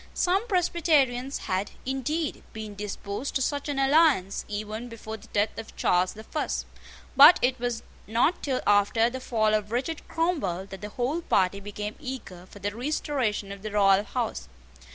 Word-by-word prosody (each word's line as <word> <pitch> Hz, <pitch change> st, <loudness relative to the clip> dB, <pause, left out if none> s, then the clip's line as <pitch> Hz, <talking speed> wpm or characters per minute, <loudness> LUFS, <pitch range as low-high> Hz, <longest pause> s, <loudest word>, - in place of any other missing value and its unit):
Some 385 Hz, +6 st, +1 dB
Presbyterians 305 Hz, -, +2 dB
had, 190 Hz, +2 st, -1 dB, 0.2 s
indeed, 270 Hz, +5 st, -2 dB
been 215 Hz, -1 st, -6 dB
disposed 205 Hz, +4 st, -5 dB
to 265 Hz, -, +1 dB
such 285 Hz, +2 st, -2 dB
an 285 Hz, -, -2 dB
alliance 275 Hz, -, +3 dB
even 215 Hz, +3 st, -5 dB
before 220 Hz, -1 st, -7 dB
the 220 Hz, +1 st, -13 dB
death 210 Hz, 0 st, 0 dB
of 225 Hz, -, -9 dB
Charles 180 Hz, +1 st, +2 dB
the 220 Hz, -, -10 dB
First: 305 Hz, +7 st, -2 dB, 0.5 s
but 290 Hz, +6 st, +10 dB
it 255 Hz, 0 st, +2 dB
was 240 Hz, -1 st, -2 dB, 0.2 s
not 240 Hz, -, +2 dB
till 265 Hz, -3 st, -1 dB
after 205 Hz, +3 st, +3 dB
the 260 Hz, -, -5 dB
fall 220 Hz, -4 st, +1 dB
of 210 Hz, 0 st, 0 dB
Richard 270 Hz, +7 st, -2 dB
Cromwell 290 Hz, -, -1 dB
that 195 Hz, -, -8 dB
the 210 Hz, -, -5 dB
whole 255 Hz, +9 st, -1 dB
party 195 Hz, -, +2 dB
became 210 Hz, +1 st, -6 dB
eager 255 Hz, -10 st, -7 dB
for -, -, -13 dB
the 205 Hz, +1 st, -4 dB
restoration 245 Hz, -6 st, -1 dB
of 200 Hz, -1 st, -8 dB
the 215 Hz, -, -4 dB
royal 200 Hz, -1 st, +4 dB
house. 215 Hz, -, -3 dB
230 Hz, 170 wpm, -27 LUFS, 205-275 Hz, 0.5 s, but